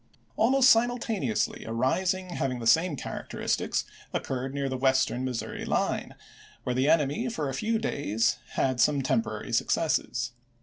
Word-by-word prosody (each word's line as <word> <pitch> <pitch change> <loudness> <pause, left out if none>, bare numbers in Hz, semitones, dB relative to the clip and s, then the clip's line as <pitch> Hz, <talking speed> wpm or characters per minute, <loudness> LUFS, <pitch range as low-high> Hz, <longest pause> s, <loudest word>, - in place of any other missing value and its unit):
Almost 260 +3 +4
simultaneously 225 - +1
a 110 - -7
rising 180 +9 0
having 135 -6 -1
the 120 - -6
same 165 +6 +4
characteristics - - -2 0.3
occurred 130 0 -3
near 140 0 -2
the 130 - -2
Western 130 -1 +2
Missouri 125 -3 -4
line, - - -1 0.5
where 125 - -1
the 130 +3 +2
enemy 160 - +2
for 155 -11 -2
a - - -4
few 225 +9 0
days 120 - 0 0.2
had 130 -2 0
some 145 0 +3
temporary 115 -4 -1
successes. 125 -2 0
135 Hz, 140 wpm, -28 LUFS, 125-185 Hz, 0.5 s, Almost